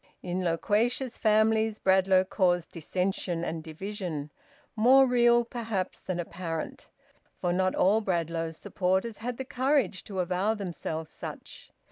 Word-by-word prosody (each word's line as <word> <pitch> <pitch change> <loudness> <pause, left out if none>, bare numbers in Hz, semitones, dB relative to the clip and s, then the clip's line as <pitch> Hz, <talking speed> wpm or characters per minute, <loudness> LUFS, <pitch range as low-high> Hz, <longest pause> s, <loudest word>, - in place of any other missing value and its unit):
In 180 +1 -2
loquacious 225 +9 0
families 220 0 +3
Bradlaugh 190 0 +4
caused 180 -3 +1
dissension 180 0 -2
and 165 -2 -3
division, 165 -3 -5 0.4
more 255 +5 +6
real 240 -1 +4
perhaps 225 -6 -3
than 185 -2 -3
apparent, 170 -1 -5 0.5
for 175 -1 0
not 185 +1 +1
all 210 +4 +3
Bradlaugh's 165 -4 -2
supporters 190 +4 -1
had 240 +1 -4
the 265 - -4
courage 260 - +1
to 195 - -7
avow 185 +4 +1
themselves 165 -5 -5
such. - - -9
190 Hz, 125 wpm, -28 LUFS, 175-225 Hz, 0.5 s, more